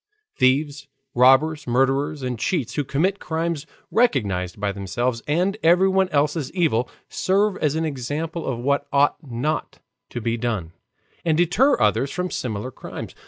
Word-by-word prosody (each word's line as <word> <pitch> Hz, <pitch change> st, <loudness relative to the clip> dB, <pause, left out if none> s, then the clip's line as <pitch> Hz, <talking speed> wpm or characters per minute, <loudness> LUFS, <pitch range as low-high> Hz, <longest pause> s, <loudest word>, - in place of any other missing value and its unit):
Thieves, 140 Hz, +2 st, +1 dB, 0.3 s
robbers, 135 Hz, +5 st, +4 dB
murderers, 135 Hz, +3 st, +1 dB
and 125 Hz, -3 st, -3 dB
cheats, 145 Hz, -, -1 dB
who 145 Hz, -, -1 dB
commit 180 Hz, +9 st, 0 dB
crimes 160 Hz, -1 st, -3 dB, 0.2 s
recognized 100 Hz, -, +1 dB
by 100 Hz, 0 st, 0 dB
themselves 115 Hz, +5 st, -2 dB
and 180 Hz, +7 st, +1 dB
everyone 190 Hz, +3 st, +4 dB
else 145 Hz, -1 st, +1 dB
as 145 Hz, -5 st, -3 dB
evil, 150 Hz, -10 st, +1 dB, 0.2 s
serve 200 Hz, +1 st, +1 dB
as 150 Hz, -1 st, 0 dB
an 160 Hz, 0 st, 0 dB
example 155 Hz, +4 st, -4 dB
of 130 Hz, -, -1 dB
what 140 Hz, +4 st, 0 dB
ought 140 Hz, +1 st, +3 dB
not 140 Hz, +2 st, -3 dB, 0.3 s
to 120 Hz, -, -5 dB
be 115 Hz, 0 st, -1 dB
done, 110 Hz, -8 st, -2 dB, 0.5 s
and 160 Hz, -2 st, +2 dB
deter 180 Hz, -, +3 dB
others 135 Hz, -, +2 dB
from 180 Hz, +3 st, -3 dB
similar 115 Hz, +1 st, -3 dB
crimes. -, -, -8 dB
145 Hz, 150 wpm, -23 LUFS, 125-165 Hz, 0.5 s, robbers